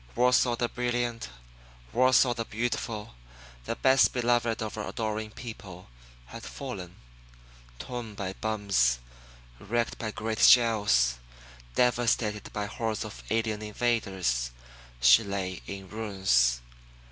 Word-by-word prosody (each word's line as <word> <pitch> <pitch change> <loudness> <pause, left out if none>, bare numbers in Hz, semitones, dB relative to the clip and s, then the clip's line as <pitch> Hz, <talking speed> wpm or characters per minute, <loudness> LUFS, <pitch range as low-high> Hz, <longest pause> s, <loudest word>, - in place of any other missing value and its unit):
Warsaw 125 0 +3
the 120 0 0
brilliant, 120 - -2 0.6
Warsaw 130 0 +4
the 115 -1 -3
Beautiful, 115 -1 -3 0.5
the - - -2
best 130 0 +4
beloved 120 -2 +1
of 110 - -5
her 105 -1 -5
adoring 110 -2 -3
people, 100 - -10 0.4
had 115 - -10
fallen. 100 -9 -7 0.8
Torn 120 - -6
by 95 -2 -4
bombs, 100 - +1 0.6
wrecked 115 +3 -2
by 110 - -3
great 110 +1 -4
shells, 105 - +5 0.6
devastated 120 -4 +1
by 105 -1 -3
hordes 110 +1 -3
of 105 - -9
alien 110 -1 0
invaders, 100 - -1 0.5
she 60 0 +7
lay 95 -2 -4
in 95 -1 -7
ruins. 95 - +1
110 Hz, 110 wpm, -28 LUFS, 100-120 Hz, 0.8 s, she